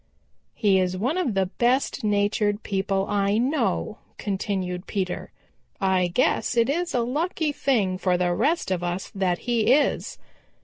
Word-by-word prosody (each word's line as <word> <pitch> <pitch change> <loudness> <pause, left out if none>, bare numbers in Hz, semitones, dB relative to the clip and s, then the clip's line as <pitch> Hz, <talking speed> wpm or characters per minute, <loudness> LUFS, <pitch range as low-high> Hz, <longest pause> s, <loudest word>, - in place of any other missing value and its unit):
"He 200 -4 +3
is 185 0 0
one 250 - 0
of 295 - -1
the 190 -1 +2
best 240 +8 0
natured 205 0 +1
people 195 -1 -1
I 200 0 +1
know," 265 +7 0 0.2
continued 190 -2 -3
Peter. 190 -3 -3 0.5
"I 190 -2 +2
guess 240 +5 +1
it 235 +3 +3
is 345 0 -2
a 245 - +2
lucky 305 +5 -1
thing 210 -11 0
for 180 -2 +1
the 175 0 +1
rest 315 - 0
of 180 -2 -1
us 175 +2 -3
that 185 -3 0
he 235 -2 +2
is. 300 - +1
205 Hz, 150 wpm, -25 LUFS, 185-250 Hz, 0.5 s, He